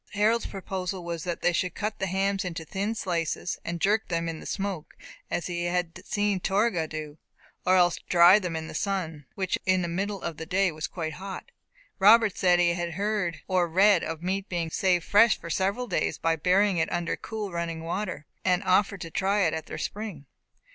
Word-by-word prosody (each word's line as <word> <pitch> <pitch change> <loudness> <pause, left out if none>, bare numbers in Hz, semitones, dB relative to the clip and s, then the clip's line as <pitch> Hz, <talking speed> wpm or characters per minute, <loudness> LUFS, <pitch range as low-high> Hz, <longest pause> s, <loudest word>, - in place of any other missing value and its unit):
Harold's 215 +3 +2
proposal 190 -1 -4
was 170 -2 -4
that 175 -2 -4
they 175 - +3
should 180 0 -1
cut 215 0 -3
the 190 - -1
hams 195 +1 0
into 165 -3 -5
thin 200 +6 -2
slices, 175 -3 -2
and 170 0 -4
jerk 210 +5 +2
them 170 -1 -1
in 165 -1 -4
the - - -9
smoke, 195 -5 -4 0.3
as 175 - -2
he 175 -1 -2
had 175 -1 -2
seen 205 -2 0
Torgah 195 -3 +1
do; 155 -1 -7 0.5
or 185 - +6
else 175 -2 +4
to - - -14
dry 175 +3 +7
them 180 -5 -4
in 160 0 -4
the - - -8
sun, 165 -8 -3
which 190 -1 -1
in 185 -1 +2
the - - -1
middle 195 +4 -2
of 165 -2 -4
the 160 - -6
day 190 0 +2
was 155 0 -4
quite 160 -3 -4
hot. 195 - -7 0.5
Robert 215 +1 +6
said 180 -1 +4
he 175 -1 +3
had 175 -1 -3
heard 200 -3 -1
or 185 -2 +2
read 190 +2 +4
of 160 +1 -5
meat 190 +2 -2
being 170 -3 -2
saved 180 -2 +1
fresh 215 +2 +5
for 170 - -7
several 195 +8 0
days 195 - -1
by 165 0 +1
burying 185 +4 +3
it 160 - 0
under 175 -1 -1
cool 215 -3 -5
running 170 -1 -3
water, 185 -1 -3 0.2
and 185 0 +2
offered 195 +1 +2
to 165 - -6
try 200 +4 +1
it 165 -5 +2
at 160 - -4
their - - -6
spring. 195 -4 -5
180 Hz, 210 wpm, -27 LUFS, 170-200 Hz, 0.5 s, dry